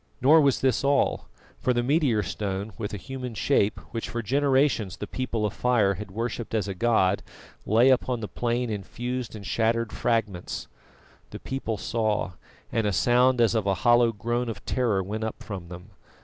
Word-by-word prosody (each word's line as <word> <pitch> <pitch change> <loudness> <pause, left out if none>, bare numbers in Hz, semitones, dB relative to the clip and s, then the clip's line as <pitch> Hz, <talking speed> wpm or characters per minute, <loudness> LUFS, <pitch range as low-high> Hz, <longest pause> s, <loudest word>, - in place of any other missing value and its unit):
Nor 155 +5 +6
was 140 -3 +2
this 130 -2 +2
all, 140 0 +1 0.3
for 125 - +1
the 120 0 0
meteor 130 -6 +2
stone 100 +2 -4
with 105 -3 -4
a 105 - -4
human 125 +2 -6
shape 105 -3 +2 0.2
which 115 - -3
for 120 0 -3
generations 135 -5 +1
the - - -5
People 120 -4 -2
of 105 - -2
Fire 120 -6 +2
had 105 +1 -7
worshipped 115 +2 -4
as 105 -3 0
a 100 - -3
god, 100 -2 +2 0.5
lay 115 +5 +5
upon 125 -1 +1
the 105 - -4
plain 120 +1 -1
in 105 -2 -3
fused 125 +3 -5
and 100 -2 -9
shattered 115 +1 0
fragments. 110 -7 -2 0.6
The - - -8
people 130 -5 -3
saw, 110 -3 -1 0.4
and 110 -2 +1
a - - +1
sound 125 +5 +3
as 115 -2 +4
of 110 -3 0
a 100 - +2
hollow 120 -1 +5
groan 120 +3 -2
of 105 -3 -7
terror 110 -7 +1
went 105 +4 -4
up 110 - -5
from 95 -5 -7
them. 90 +4 -11
115 Hz, 185 wpm, -26 LUFS, 105-125 Hz, 0.6 s, Nor